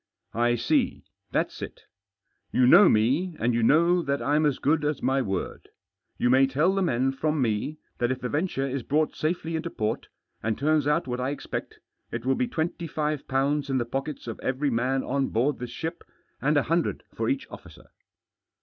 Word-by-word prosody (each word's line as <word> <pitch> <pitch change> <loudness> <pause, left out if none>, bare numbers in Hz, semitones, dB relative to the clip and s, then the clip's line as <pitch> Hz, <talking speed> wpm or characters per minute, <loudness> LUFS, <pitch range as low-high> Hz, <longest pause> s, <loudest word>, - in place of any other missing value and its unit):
" - - -46
I 120 - +3
see. 120 - 0 0.3
That's - - -1
it - - -7 0.7
You 125 - +4
know 175 +11 +8
me, 140 +12 +2
and 120 +2 +1
you 120 - +1
know 170 +8 +4
that 140 -3 -1
I'm 150 +2 +2
as 145 - 0
good 150 +1 +1
as 150 -1 0
my 135 +1 +2
word. 95 -6 -4 0.5
You - - +1
may 130 +2 +5
tell 150 +8 +2
the 195 - 0
men 135 -6 +1
from 150 +3 -1
me 120 +5 -1 0.2
that 120 - +1
if 130 - -2
the 125 - -3
venture 145 -2 -1
is 135 0 -2
brought 150 +5 0
safely 165 +1 -2
into 160 +1 -3
port, 110 -6 -2 0.3
and 110 -1 -1
turns 150 0 +2
out 150 +3 +2
what 125 -1 -3
I 130 +1 -1
expect, 145 - -5 0.3
it 120 0 -4
will 135 - +3
be 250 - 0
twenty 170 -4 -3
five 150 -1 -2
pounds 140 +2 0
in 135 - +1
the 120 - 0
pockets 135 +5 -4
of 115 -2 -6
every 135 +2 -1
man 130 +3 0
on 135 0 0
board 130 +5 0
this 125 -1 -5
ship, 160 +8 -5 0.4
and 150 +2 +2
a 145 - +3
hundred 165 +3 0
for - - -1
each 275 -2 -1
officer." - - -13
140 Hz, 200 wpm, -26 LUFS, 125-155 Hz, 0.7 s, know